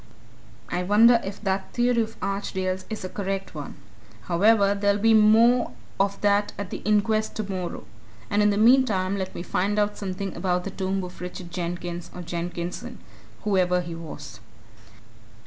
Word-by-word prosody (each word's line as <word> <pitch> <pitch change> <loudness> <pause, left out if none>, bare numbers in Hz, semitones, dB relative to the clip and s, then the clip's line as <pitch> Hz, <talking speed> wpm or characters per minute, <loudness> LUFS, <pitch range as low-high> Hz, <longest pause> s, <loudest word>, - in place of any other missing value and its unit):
I 175 - -1
wonder 225 +5 +5
if 195 +1 -6
that 190 -1 -2
theory 240 -1 +2
of 225 0 -5
Archdale's 190 -1 -2
is 215 -4 -5
a - - -2
correct 195 0 -4
one? - - -7 0.5
however, 200 +3 +4
there'll 200 0 +1
be 225 +2 +4
more 225 - +5 0.3
of 200 0 +1
that 205 0 +2
at 200 -1 -5
the - - -3
inquest 215 +1 +1
tomorrow. 190 -4 -4 0.4
And 205 - +1
in 210 - +4
the 205 - +1
meantime 215 -5 +4
let 190 -1 -4
me - - -5
find 200 +3 -1
out 210 0 0
something 195 -1 -4
about 180 -1 0
the 195 - -5
tomb 190 0 -2
of 180 0 -9
Richard 180 -1 -7
Jenkins, 175 0 -4
or 180 - -6
Jenkinson 175 +1 -5 0.5
whoever 180 -3 +2
he 170 -1 -6
was." 150 -7 -9
195 Hz, 160 wpm, -25 LUFS, 180-210 Hz, 0.5 s, wonder